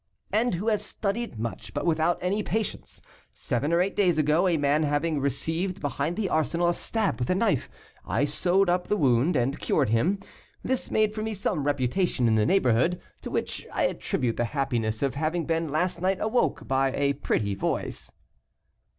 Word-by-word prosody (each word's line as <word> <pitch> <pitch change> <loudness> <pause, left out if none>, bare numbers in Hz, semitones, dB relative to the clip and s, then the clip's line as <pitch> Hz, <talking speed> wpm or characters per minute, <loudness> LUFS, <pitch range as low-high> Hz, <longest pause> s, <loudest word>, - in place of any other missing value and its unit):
"And 225 -2 +2
who 195 +6 -4
has 210 -2 0
studied 210 - -3
much, 110 -2 -5
but - - -2
without 165 +1 +2
any 195 +4 +1
patients. 220 0 -4 0.3
Seven 135 +6 -2
or 170 +1 +4
eight 195 +2 -1
days 180 -5 +3
ago, 155 +4 +3
a 170 -3 +2
man 145 +1 +2
having 150 +1 0
received 165 +7 -1
behind 145 +2 -2
the 215 -2 -1
Arsenal 170 +2 +1
a - - +2
stab 220 -1 -1
with 120 - -2
a 185 - +3
knife, 195 - +1 0.3
I 145 - 0
sewed 180 +6 +2
up 180 0 +1
the 210 - +1
wound, 135 - +3
and 135 +2 0
cured 135 -7 +1
him. 155 - +2 0.5
This 260 -1 -1
made 215 -1 +2
for 215 - -4
me 220 0 -3
some 185 -7 -1
reputation 145 0 +1
in 110 - +3
the 110 -1 +3
neighborhood, 170 -2 +3 0.2
to - - -6
which - - -3
I - - 0
attribute 120 -3 -1
the 120 - +1
happiness 115 -4 0
of 135 -3 +1
having 160 +4 -1
been 165 0 0
last 170 +4 -1
night 190 +1 +1
awoke 220 +3 0
by 135 0 +2
a 140 0 +2
pretty 100 -6 -1
voice." - - -3
160 Hz, 185 wpm, -26 LUFS, 135-190 Hz, 0.5 s, or